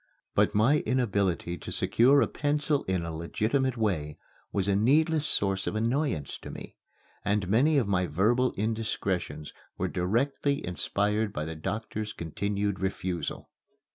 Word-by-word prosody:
But - - +2
my 125 +8 +4
inability 100 -10 0
to - - -7
secure 135 +5 +4
a - - 0
pencil 145 +1 0
in 95 -2 -1
a 80 -1 -5
legitimate 115 - 0
way 80 -10 -1 0.3
was 100 -1 0
a 100 - +2
needless 150 +8 +3
source 95 -1 +2
of - - -2
annoyance 115 - -1
to - - -9
me, - - -9 0.5
and 100 -2 0
many 135 - +3
of 125 -7 +2
my 90 -2 +1
verbal 110 - +2
indiscretions 100 -8 -2 0.2
were - - -1
directly 135 +9 0
inspired 105 +4 0
by 75 -4 -3
the 80 0 -5
doctor's 110 +5 -4
continued 100 +5 -2
refusal. 95 -2 -3
105 Hz, 140 wpm, -28 LUFS, 90-125 Hz, 0.5 s, my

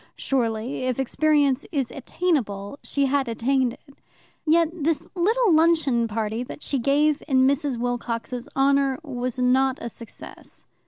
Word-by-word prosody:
Surely, 240 0 -2
if 255 0 -1
experience 285 0 +2
is 270 -5 -1
attainable, 265 - -2
she 280 -1 0
had 275 -1 +1
attained 245 +2 0
it. 280 +2 -19 0.5
Yet 330 +1 +4
the 320 0 0
little 420 +3 +2
luncheon 310 -7 +3
party 220 +1 -2
that 250 - -8
she 275 - -1
gave 290 +4 +2
in 260 -3 +4
Mrs. 280 -1 +1
Wilcox's 245 +1 -3
honour 275 -1 +2
was 255 -4 -4
not 260 +1 +2
a 235 - -6
success. 230 -1 -12
270 Hz, 140 wpm, -24 LUFS, 245-290 Hz, 0.5 s, Yet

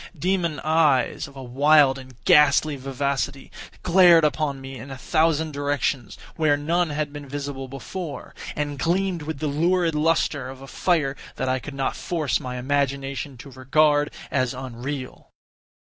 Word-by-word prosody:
Demon 170 -1 0
eyes, 155 -4 +2
of 140 - -16
a 135 - -8
wild 140 +2 +4
and 130 -1 -13
ghastly 150 0 +5
vivacity, 135 -1 -3 0.3
glared 175 -2 +6
upon 150 -2 0
me 135 0 -8
in 140 - -9
a 135 - -7
thousand 160 +1 +1
directions, 145 -4 -2 0.2
where 155 -3 +3
none 170 +4 0
had 150 -1 -3
been 145 -2 -8
visible 140 -1 -5
before, 140 +2 -7 0.2
and 145 -1 -3
gleamed 175 +3 0
with 155 0 -5
the 155 - -4
lurid 170 +3 +1
lustre 150 -3 +1
of 130 0 -9
a 135 - -10
fire 150 -4 0 0.2
that - - -2
I 130 0 +1
could 145 +2 -8
not 135 -1 -1
force 150 -8 -1
my 125 -1 -5
imagination 140 0 -2
to 140 +4 -11
regard 145 +3 +2 0.2
as 130 -2 0
unreal. 130 +1 -6
145 Hz, 155 wpm, -24 LUFS, 135-155 Hz, 0.3 s, glared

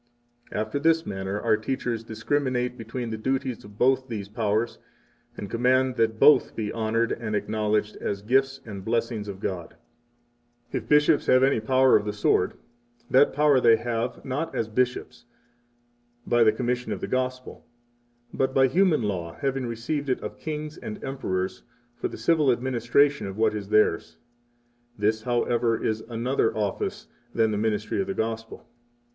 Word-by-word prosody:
18 - - -6
After 110 +6 -2
this 165 +2 +2
manner 95 +1 -3
our 110 -1 +2
teachers 115 0 -3
discriminate 125 +2 -1
between 125 -2 -5
the 110 - -4
duties 130 0 -2
of 105 0 -14
both 130 +2 +2
these 105 -5 -5
powers, 110 +1 -1 0.6
and 100 - -5
command 130 +3 +2
that 110 -1 +1
both 150 - +5
be 105 -2 -3
honored 115 +1 0
and 110 -2 -3
acknowledged 105 0 -1
as 100 0 -4
gifts 135 +4 +1
and 100 -4 -7
blessings 115 -1 -1
of 100 -1 -7
God. 90 -4 -5 1.0
19 - - -1
If - - -18
bishops 150 +1 +4
have 130 0 +5
any 135 -3 +3
power 130 +3 +4
of 105 - +2
the 105 - -2
sword, 105 - +1 0.6
that 135 +3 +5
power 145 -1 +4
they 115 -1 +6
have, 115 +1 -3
not 140 +5 -3
as 115 - -1
bishops, 125 +2 -2 1.0
by 120 -1 +4
the 110 - +5
commission 125 +2 -2
of - - -3
the - - -3
Gospel, 130 0 -3 0.7
but 130 0 0
by 135 - +6
human 165 -1 +3
law 90 -5 -3
having 135 -3 -1
received 135 +5 -3
it 130 - +1
of - - -7
kings 155 0 -5
and 105 - -6
emperors 95 -9 -3 0.3
for - - -3
the - - -9
civil 155 -5 +3
administration 125 +2 +1
of 95 +1 -7
what 110 -1 +2
is 100 -2 -5
theirs. 85 -6 +2 0.8
This, 110 +1 +1
however, 120 -1 +1
is 110 0 -1
another 115 0 0
office 105 -2 -2 0.3
than 110 -1 +3
the 105 - -1
ministry 110 - -1
of 190 - -3
the 195 - -3
Gospel. 115 0 -4
115 Hz, 165 wpm, -26 LUFS, 110-130 Hz, 1.0 s, they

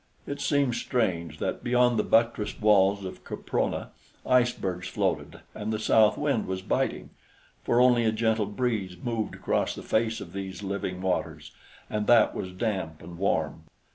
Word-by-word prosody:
It 140 0 -5
seemed 140 -3 +2
strange 90 - -1
that - - -3
beyond 120 -1 +3
the - - +2
buttressed 115 -2 +1
walls 100 -2 +4
of 95 - -8
Caprona - - -2 0.3
icebergs 120 -8 +1
floated - - -2
and 105 +1 -4
the 110 - 0
south 110 0 +4
wind - - 0
was 95 0 -3
biting, - - -1 0.5
for 120 - +2
only 125 -2 +5
a 110 - +3
gentle 110 -1 +1
breeze 105 -4 -2
moved 115 +2 -3
across - - -1
the - - -8
face 110 0 0
of - - -9
these 95 0 -6
living 95 -2 -3
waters, 95 -1 -2 0.4
and 105 -1 -2
that 120 -2 +5
was 90 - -5
damp 90 -6 -3
and 85 +1 -10
warm. 80 -4 -1
105 Hz, 160 wpm, -27 LUFS, 95-120 Hz, 0.5 s, only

